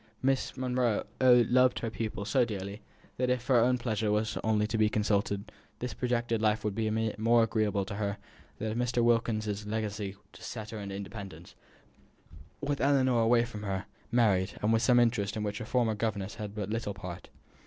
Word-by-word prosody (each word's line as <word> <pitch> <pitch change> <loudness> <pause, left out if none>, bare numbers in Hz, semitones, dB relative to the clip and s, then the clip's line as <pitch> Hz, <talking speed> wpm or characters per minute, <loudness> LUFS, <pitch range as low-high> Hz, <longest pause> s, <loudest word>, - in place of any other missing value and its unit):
Miss 135 0 0
Monro 125 -4 0 0.2
loved 125 0 +5
her 115 - -2
pupil 110 -3 -4
so 130 +3 +3
dearly, 100 -2 -5 0.4
that, 125 0 +1
if 125 -1 0
her 130 -2 +4
own 125 +2 +3
pleasure 110 -3 -1 0.4
only 110 -1 +2
were - - +2
to 115 +1 -2
be 110 -1 +4
consulted, 100 -1 0 0.3
this 125 - -4
projected 120 -2 -1
life 110 0 +2
would 105 -1 -1
be 110 +1 -1 0.3
more 115 +1 +4
agreeable 105 -3 0
to 100 - -6
her 100 -1 -2 0.4
than 110 0 -3
if 110 - -3
Mr. 125 -1 +1
Wilkins's 110 -3 +1
legacy 105 -2 -3 0.2
had - - -14
set 110 -2 -6
her 110 - -5
in 100 -1 -6
independence, 100 0 -8 1.1
with 145 -1 -1
Ellinor 130 -3 +3
away 115 +1 +4
from 110 -3 -8
her, 95 -2 -3 0.3
married, 100 -5 +3
and 110 +2 +3
with 115 +3 +2
interests 115 -4 +3
in 105 - -2
which 105 0 -3
her - - -5
former 115 -1 +1
governess 105 -2 -2
had 105 -2 -7
but 105 -1 -3
little 110 -3 -2
part. 90 -3 -8
110 Hz, 185 wpm, -30 LUFS, 105-120 Hz, 1.1 s, loved